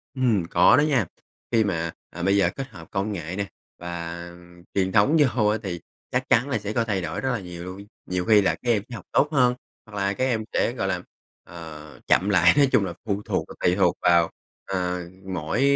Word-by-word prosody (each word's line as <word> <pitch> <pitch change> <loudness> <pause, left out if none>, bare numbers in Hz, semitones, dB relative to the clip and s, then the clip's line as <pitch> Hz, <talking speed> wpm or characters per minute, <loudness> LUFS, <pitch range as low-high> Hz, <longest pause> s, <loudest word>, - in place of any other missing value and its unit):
Ừm, 120 -9 +2
có 90 +1 +6
đó - - +5
nha. 140 -8 +2 0.5
Khi 115 -2 +4
mà, 85 -5 -1 0.2
à, 85 - -7
bây 100 +2 +3
giờ 100 - +4
kết 135 -1 -5
hợp 80 -7 -12
công 100 +2 -1
nghệ 85 -1 -5
nè 100 0 -2 0.3
và 85 0 -5 0.5
truyền 95 -1 +1
thống 110 +10 +4
vô 125 -7 +3
á, 105 +1 +2
thì 90 -3 -4 0.3
chắc 130 +1 -1
chắn 125 +2 +3
là 130 - +1
sẽ 105 +1 -4
có 115 - +2
thay 100 -4 -1
đổi 80 -1 -4
rất 130 - 0
là 120 - -1
nhiều 90 -2 -8
luôn. 95 +2 -8 0.2
Nhiều 90 -1 -2
khi 105 0 +6
là 95 - +2
các 120 - -3
em 110 -3 +2
sẽ 120 - -6
học 95 - -9
tốt 145 - +4
hơn, 125 -4 +4 0.3
hoặc 110 - -12
là 100 0 +1
các 130 - -2
em 115 -4 0
sẽ, - - +2
gọi - - -2
là, - - -1 0.4
ờ, 80 -4 -10
chậm 95 - +3
lại, 90 -4 +6
nói 140 -1 +6
chung 100 - +4
là 85 - -4
phụ 100 -1 -1
thuộc - - -1
và - - -10
tùy 90 - +2
thuộc 90 -3 +2
vào, 85 -1 +4 0.4
ờ, 90 -2 -1 0.3
mỗi 80 +7 -1
100 Hz, 230 wpm, -24 LUFS, 85-115 Hz, 0.5 s, có